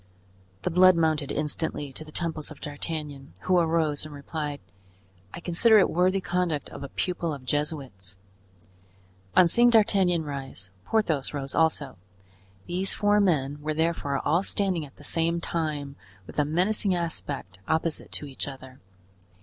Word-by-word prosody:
The 180 - 0
blood 185 +1 +7
mounted 155 -3 +1
instantly 150 -1 -2
to 155 - -6
the 155 - -10
temples 160 -2 -2
of 155 - -11
D'Artagnan, 145 -1 -5
who 185 -1 +3
arose, 160 -3 +1
and 155 - -7
replied: 145 0 -4 0.7
"I - - -7
consider 185 +6 +4
it 195 - +4
worthy 185 +3 +3
conduct 175 -5 -1
of - - -9
a 140 - -6
pupil 175 -2 -2
of 130 -2 -12
Jesuits." 135 - -3 1.2
On 180 - +7
seeing 240 +8 +6
D'Artagnan 195 -7 +4
rise, 135 -10 -7
Porthos 160 -11 0
rose 135 -1 -4
also; 150 - +1 0.7
these 185 +2 0
four 205 0 +3
men 145 -7 +1
were 155 +1 -2
therefore 160 -3 0
all 165 +4 +3
standing 190 -6 -1
at 135 - -21
the - - -15
same 165 +3 +1
time, 150 -4 -3 0.3
with - - -5
a 150 - +3
menacing 185 +5 +1
aspect, 145 - -4
opposite 160 0 -1
to - - -1
each 135 0 -5
other. 130 -1 -10
160 Hz, 150 wpm, -27 LUFS, 145-175 Hz, 1.2 s, blood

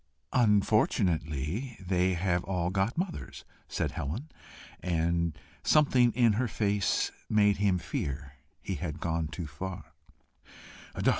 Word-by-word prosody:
"Unfortunately 105 - +2
they 90 -1 +1
have 85 0 0
all 90 -2 -1
got 95 - 0
mothers," 170 - -4 0.2
said - - -1
Helen; 110 - -4 0.5
and 85 -2 0 0.3
something 130 -5 +5
in 115 -1 +4
her 120 +4 +1
face 100 -2 +1 0.2
made 105 -1 +4
him 100 -2 +2
fear 70 -4 -4 0.3
he 95 - -2
had 85 -4 -4
gone 80 -2 -1
too 85 +2 -5
far. 90 +6 -7
95 Hz, 115 wpm, -30 LUFS, 85-110 Hz, 0.5 s, something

